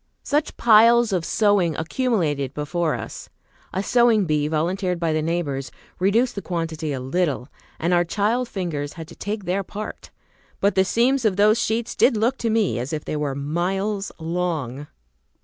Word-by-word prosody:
Such 295 +1 -1
piles 230 0 +6
of 180 -3 0
sewing 200 -5 +2
accumulated 160 - -1
before 155 +2 -1
us! - - -7 0.4
A 190 - -2
sewing 235 -3 +4
bee, 150 -2 +1
volunteered 180 +4 -1
by 165 -2 0
the 155 - +1
neighbors, 155 -5 -2 0.3
reduced 220 +7 +2
the 200 - -5
quantity 165 -4 -3
a 135 - -3
little, 140 0 -1 0.3
and 170 +3 0
our 175 0 +4
child 220 +7 0
fingers 160 -8 -3
had 165 -2 -8
to - - -12
take 205 0 -4
their 185 +3 0
part. 210 +3 -7 0.5
But 200 +1 +2
the 190 0 +3
seams 245 +6 +2
of 215 -4 +2
those 210 +3 +4
sheets 225 +1 -1
did 240 -3 +4
look 235 +5 +1
to 230 - 0
me 220 - +1
as 130 +6 -4
if 150 - -4
they - - -3
were 145 -2 -2
miles 190 +8 -2
long! 160 -5 -3
180 Hz, 170 wpm, -23 LUFS, 155-215 Hz, 0.5 s, piles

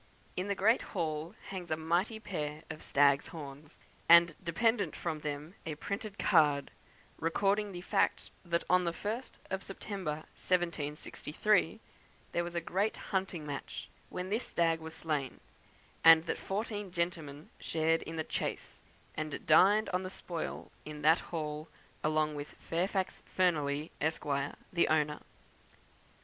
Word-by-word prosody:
In 185 +2 -2
the 200 - 0
great 220 +5 +4 0.2
hall 160 +2 -2
hangs 185 -3 -5
a 155 - 0
mighty 175 +8 0
pair 155 -7 -4
of 155 - -8
stag's 140 0 +4
horns, 145 -1 -9 0.3
and 170 -1 +8
dependent 200 +1 +1
from 160 -3 -3
them 150 +2 -4
a 155 - -4
printed 200 +5 -4
card, 150 -8 +4 0.5
recording 200 +5 +1
the 175 -1 -6
fact - - +1
that, 170 -1 0
on 180 0 +4
the 170 -1 0
1st 220 +8 -4 0.2
of 190 0 -1
September, 190 -6 -4 0.2
1763, 170 +3 0 0.5
there 170 - +1
was 175 0 -6
a - - +2
great 195 +6 0 0.2
hunting 185 -5 -1
match, 145 -2 -5 0.2
when 180 +1 -4
this 220 +5 -1
stag 165 -1 +2
was 160 0 -8
slain; 150 -4 -2 0.6
and 165 0 +9
that 165 - -2
fourteen 205 -1 -3
gentlemen 165 -4 -3
shared 165 0 +1
in 165 - -6
the 160 - -1
chase, - - -4 0.4
and 155 -1 -4
dined 200 +7 +6
on 180 0 0
the 185 - -4
spoil 175 -3 -5
in 150 -1 -8
that 160 +3 +6
hall, 155 -1 -4 0.4
along 155 0 +2
with 145 0 -6
Fairfax 185 +3 -1 0.2
Fearneley, 155 -4 +2
Esq., 160 +2 0 0.5
the 170 - +4
owner. 150 -1 +2
165 Hz, 140 wpm, -33 LUFS, 155-190 Hz, 0.6 s, and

